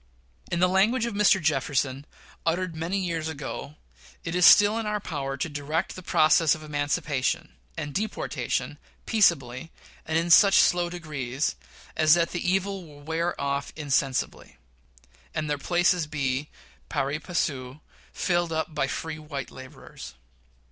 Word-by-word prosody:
In 175 - 0
the 180 - +6
language 210 +6 +2
of 235 - -3
Mr. 200 -1 +4
Jefferson, 140 -3 -1 0.4
uttered 170 +1 -1
many 165 +5 -2
years 170 -4 -2
ago, 145 -1 -6 0.5
"It 165 - -4
is 180 -1 +6
still 205 +2 +7
in 225 - -3
our 210 0 -1
power 140 -7 -4
to 135 - -2
direct 150 +3 -3
the 185 - -8
process 160 -2 +4
of 155 - -11
emancipation 145 - -1 0.2
and 145 - -4
deportation 215 +6 -3 0.3
peaceably, 165 - +1 0.4
and 160 0 +1
in 170 +1 0
such 200 +2 +7
slow 175 -1 +4
degrees 150 -6 -3 0.4
as 155 0 +5
that 170 -1 +1
the 175 - -3
evil 195 0 -1
will 145 -3 -14
wear 165 +3 -2
off 140 0 -2
insensibly, 135 - -1 0.8
and 155 -1 -2
their 145 -1 -1
places 175 0 +2
be, 140 -1 -2 0.4
pari 140 0 -1
passu, 145 -6 -3 0.3
filled 175 -2 0
up 160 0 -2
by 135 - 0
free 155 +3 -5
white 145 -3 -6
laborers. 130 - -11
160 Hz, 145 wpm, -26 LUFS, 145-175 Hz, 0.8 s, still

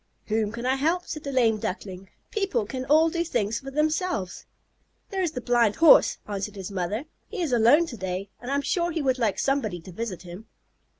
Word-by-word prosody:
'" - - -44
"Whom 215 -1 +1
can 235 +2 -6
I 260 +1 +2
help?" 330 +6 +1
said 305 - -6
the 280 - -4
lame 230 -5 +3
Duckling. 190 -1 -5 0.2
"People 390 - 0
can 255 +4 -5
all 315 +3 +4
do 340 0 0
things 230 -9 -1
for 270 - -8
themselves." 305 - -1 0.6
"There 385 -1 -1
is 340 -4 -1
the 250 - -4
Blind 235 -3 +2
Horse," 330 -2 +6
answered 205 0 -4
his 195 0 -6
mother. 200 - -2 0.2
"He 430 - -7
is 320 -7 -1
alone 245 +8 +5
to 255 -8 -8
day, 190 +1 -4
and 245 - -7
I'm 280 +1 0
sure 345 +4 0
he 325 -3 -2
would 260 -1 +1
like 220 -5 +1
somebody 250 -10 0
to 185 - -11
visit 190 -1 -5
him." 180 +5 -10
245 Hz, 215 wpm, -26 LUFS, 205-305 Hz, 0.6 s, Horse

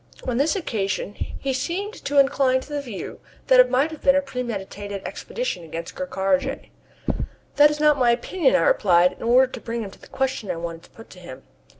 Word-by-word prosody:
On 245 -2 0
this 290 +7 +2
occasion 205 - -2
he 270 +5 -4
seemed 360 +11 -3
to 285 - -1
incline 270 -1 +4
to 270 - -13
the 290 - -1
view 235 -8 -7 0.3
that - - +5
it - - +7
might 280 +5 +2
have 315 - -9
been 275 - +5
a 280 - +4
premeditated 205 -6 -5
expedition 480 - -4
against 165 +1 -7
Ker 185 - -5
Karraje. 270 +10 -1 0.9
"That 295 0 +8
is 300 0 -3
not 300 -2 +4
my 245 -2 +4
opinion," 335 - +2
I - - +4
replied, 180 - +4
in - - -17
order 245 +3 +5
to 255 -3 -8
bring 230 0 -4
him 195 - -7
to - - -18
the - - -14
question 265 -5 -2
that - - -2
I - - -7
wanted 165 0 -6
to - - -21
put 225 - -15
to 185 - -13
him. 135 -7 -11
255 Hz, 220 wpm, -23 LUFS, 195-285 Hz, 0.9 s, That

